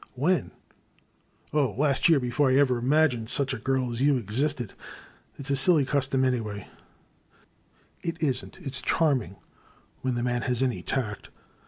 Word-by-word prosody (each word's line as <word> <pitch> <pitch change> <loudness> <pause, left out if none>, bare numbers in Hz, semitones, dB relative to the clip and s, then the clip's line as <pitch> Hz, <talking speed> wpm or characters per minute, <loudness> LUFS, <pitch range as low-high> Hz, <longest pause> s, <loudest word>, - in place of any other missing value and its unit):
When? 150 +3 +1 1.0
Oh, 140 -8 +1
last 140 +1 +2
year, 160 -4 +5
before 130 +3 +1
I 130 - +3
ever 130 -3 +3
imag 155 +5 +4
ined 115 -2 -5
such 135 -1 +1
a 130 - -4
girl 130 0 0
as 120 +1 -3
you 140 -1 +4
existed. 125 +2 -2 0.6
It 140 - -8
*s 140 - -4
a - - +3
silly 150 +1 +3
cus 140 -1 0
tom, 135 -1 +1
anyway 110 -6 -2 0.7
" - - -35
It 165 0 -4
is 135 -5 0
n*t, - - -13
— - - -14
^it 135 - -5
's 130 - +1
charming 130 - +1 0.3
— - - -33
^when 130 -2 0
the 120 - -2
man 125 0 0
has 125 -1 0
any 125 -2 -1
tact. 110 -7 -3
130 Hz, 190 wpm, -27 LUFS, 120-145 Hz, 1.0 s, year